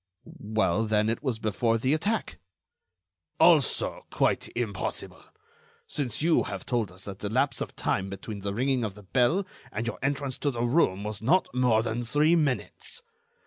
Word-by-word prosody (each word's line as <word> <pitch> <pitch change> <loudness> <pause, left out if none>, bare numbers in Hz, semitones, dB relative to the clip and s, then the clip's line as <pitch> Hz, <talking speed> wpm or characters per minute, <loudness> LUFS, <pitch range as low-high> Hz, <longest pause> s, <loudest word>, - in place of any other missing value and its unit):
"Well, 110 -1 +1
then, 105 0 +2
it 115 - -1
was 130 -6 -1
before 115 +1 +1
the 130 +5 +1
attack." 205 +8 -1 1.0
"Also, - - +3
quite - - +1
impossible, 115 -4 -3 0.6
since 135 - -2
you 165 0 +4
have 100 -2 -5
told 120 -6 -1
us 90 +1 -9
that 100 -1 -7
the 105 - -3
lapse 130 +6 +1
of - - -4
time 95 0 -1
between 100 +2 -6
the 100 0 -3
ringing 130 +1 +1
of 105 -3 -3
the 105 - -13
bell 130 - +2 0.3
and 110 +2 -3
your 120 - -4
entrance 140 -1 -1
to 145 - +1
the 120 -3 -2
room 120 - +2
was 105 -1 -4
not 165 +9 +2
more 125 -3 +3
than 115 +1 -2
three 150 +7 +3
minutes. 160 - -2
120 Hz, 170 wpm, -28 LUFS, 105-140 Hz, 1.0 s, you